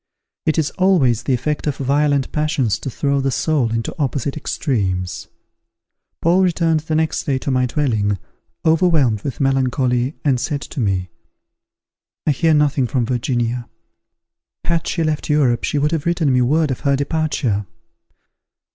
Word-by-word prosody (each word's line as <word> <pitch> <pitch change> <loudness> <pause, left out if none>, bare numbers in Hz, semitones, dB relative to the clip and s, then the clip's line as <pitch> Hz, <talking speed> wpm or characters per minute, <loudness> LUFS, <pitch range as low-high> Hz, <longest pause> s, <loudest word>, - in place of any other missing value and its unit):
It 155 - +2
is 155 -2 +1
always 150 - +3
the 130 - 0
effect 150 +5 -2
of 145 - -1
violent 140 0 +1
passions 150 -7 0
to 135 - -4
throw 140 +2 0
the 135 - 0
soul 135 -3 0
into 115 0 -2
opposite 140 0 -1
extremes. 95 - -2 1.0
Paul 175 +3 +4
returned 165 -3 +2
the 155 +1 -3
next 160 0 0
day 135 -2 +1
to 135 - -3
my 130 -1 +2
dwelling, 110 -8 0 0.5
overwhelmed 160 - +3
with 135 - -5
melancholy, 130 -1 +1
and 135 -4 +3
said 145 +2 -2
to 150 - -7
me, 95 -5 -1 1.1
"I - - +3
hear 160 +3 +2
nothing 145 -3 +2
from 125 -1 0
Virginia. 120 0 -1 1.0
Had 170 -1 0
she 165 - 0
left 155 -1 -2
Europe 135 -6 +2
she 150 - -1
would 150 +2 +1
have 165 -1 -2
written 165 -5 +2
me 125 - +3
word 150 +4 +2
of 130 - -3
her 140 -2 +2
departure. 140 - -1
140 Hz, 155 wpm, -19 LUFS, 125-155 Hz, 1.1 s, Paul